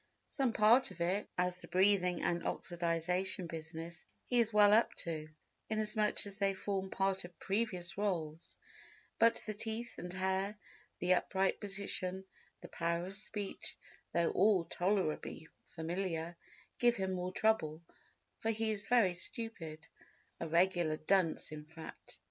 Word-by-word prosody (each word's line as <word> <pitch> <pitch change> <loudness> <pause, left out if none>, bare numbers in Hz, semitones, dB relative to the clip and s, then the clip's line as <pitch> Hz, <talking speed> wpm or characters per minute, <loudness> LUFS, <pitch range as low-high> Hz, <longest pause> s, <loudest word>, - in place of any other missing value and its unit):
Some 265 -4 +1
part 225 +4 +5
of 185 -2 -12
it, 185 +4 0
as 180 0 +1
the 170 - -6
breathing 185 -2 +3
and 170 0 +1
oxidisation 175 +2 0
business, 165 +1 -7 0.2
he 245 - +2
is 230 -1 +4
well 210 -1 +7
up 225 +2 +4
to, 155 -2 -4 0.4
inasmuch 215 -1 +1
as 200 0 -7
they 195 -1 +2
form 190 0 -2
part 195 0 0
of 175 -1 -11
previous 195 -3 -2
roles, 165 -6 -2 0.6
but 230 0 +5
the 215 - -3
teeth 225 +3 -4
and 180 - -5
hair, 190 +2 -1 0.4
the 180 +1 +3
upright 190 +1 +1
position, 195 -2 -2 0.4
the - - -8
power 170 +1 -1
of 190 - -6
speech, 205 0 -4 0.3
though 170 -1 +2
all 190 -3 +4
tolerably 175 -4 -1 0.2
familiar, 170 0 -3 0.4
give 240 -1 +4
him 190 -2 -1
more 180 0 -2
trouble—for 180 +1 -2
he 225 0 +1
is 205 -1 -2
very 225 -7 +4
stupid—a 170 -7 -8
regular 170 -1 +2
dunce 170 -2 +1
in 150 -1 -7
fact. 160 +1 -11
190 Hz, 135 wpm, -35 LUFS, 170-205 Hz, 0.6 s, well